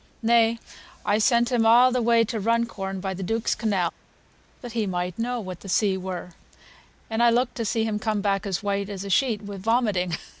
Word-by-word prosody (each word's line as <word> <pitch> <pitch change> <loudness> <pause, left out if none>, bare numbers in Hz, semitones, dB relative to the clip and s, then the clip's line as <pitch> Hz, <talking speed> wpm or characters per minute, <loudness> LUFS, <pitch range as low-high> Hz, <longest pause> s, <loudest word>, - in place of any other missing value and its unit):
Nay, 230 0 +4 0.5
I 205 +1 +2
sent 235 +2 +3
him 240 -2 +2
a' 240 +3 +6
the 250 - +1
way 230 0 +4
to 230 0 -3
Runcorn 210 -4 -1
by 190 0 -3
th' 190 +1 -6
Duke's 225 +4 0
canal, 195 -7 -1 0.7
that 245 - -7
he 220 -2 -1
might 180 +1 -3
know 245 +1 -1
what 185 -5 -7
th' 195 - -10
sea 195 0 +2
were; 185 -1 -6 0.8
and 225 +1 -1
I 240 - +6
looked 245 +1 +1
to 230 - -2
see 225 +1 0
him 215 -1 -1
come 215 -1 -1
back 200 0 0
as 195 +1 -2
white 200 0 -1
as 195 -2 -5
a 200 - -4
sheet 225 -3 +1
wi' 200 -1 -7
vomiting. 195 -5 0
215 Hz, 210 wpm, -25 LUFS, 195-235 Hz, 0.8 s, a